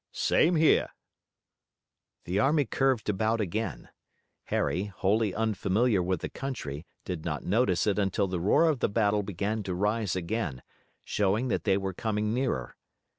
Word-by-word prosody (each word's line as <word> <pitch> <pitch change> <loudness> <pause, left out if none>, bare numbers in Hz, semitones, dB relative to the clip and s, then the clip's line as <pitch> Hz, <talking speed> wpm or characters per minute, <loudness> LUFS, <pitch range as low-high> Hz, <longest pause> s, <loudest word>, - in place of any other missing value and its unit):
"Same 170 +3 +3
here." 160 0 +4 1.3
The 90 +3 -1
army 145 +5 +3
curved 130 -1 +1
about 110 +3 +1
again. 100 - -3 0.6
Harry, 85 +7 0
wholly 105 +2 0
unfamiliar 110 0 +1
with 90 -1 -1
the - - -2
country, 85 - -6 0.2
did 90 -4 -4
not 75 -3 -3
notice 100 -3 +2
it 105 -1 +1
until 100 0 +1
the 90 -1 -2
roar 100 - +4
of 150 -5 +1
the - - +1
battle 105 -1 +2
began 100 +2 -2
to 95 -3 -4
rise 105 +1 0
again, 90 - -3 0.4
showing 105 +5 0
that - - -1
they 95 -2 +3
were 95 -1 -3
coming 105 +1 -1
nearer. 125 - -2
105 Hz, 150 wpm, -28 LUFS, 95-115 Hz, 1.3 s, here